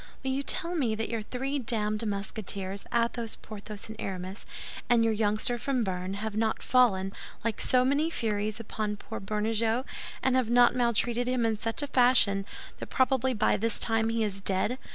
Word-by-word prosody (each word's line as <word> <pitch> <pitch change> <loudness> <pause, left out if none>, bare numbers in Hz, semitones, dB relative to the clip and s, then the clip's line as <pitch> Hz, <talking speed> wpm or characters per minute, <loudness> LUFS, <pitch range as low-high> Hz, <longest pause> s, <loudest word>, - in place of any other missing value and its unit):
"Will 265 - -1
you 270 +1 0
tell 340 +4 -1
me 255 -10 0
that 225 +1 -3
your 230 -2 -2
three 265 +6 -3
damned 215 -2 +1
Musketeers, 200 -1 -3
Athos, 235 -1 0
Porthos, 210 -1 -8
and 220 - -8
Aramis, 190 +1 -5 0.4
and 235 -1 +5
your 225 -1 +2
youngster 215 +3 0
from 255 -2 0
Béarn, 185 0 -3
have 210 +1 -4
not 220 0 0
fallen, 195 -7 +3 0.3
like 230 -1 -1
so 255 0 +3
many 285 +4 +2
furies, 215 -6 -2
upon 215 -2 -3
poor - - -7
Bernajoux, 220 +4 0 0.4
and 260 -1 +3
have 255 -3 +1
not 245 0 +6
maltreated 240 0 +1
him 250 -2 +1
in 225 -1 +1
such 225 +5 -1
a - - -2
fashion 245 -7 +4 0.3
that - - -6
probably 260 -1 +1
by 210 - +2
this 225 0 +1
time 225 -1 +2
he 225 0 0
is 200 -2 -1
dead? 200 +6 +1
225 Hz, 180 wpm, -29 LUFS, 210-245 Hz, 0.4 s, not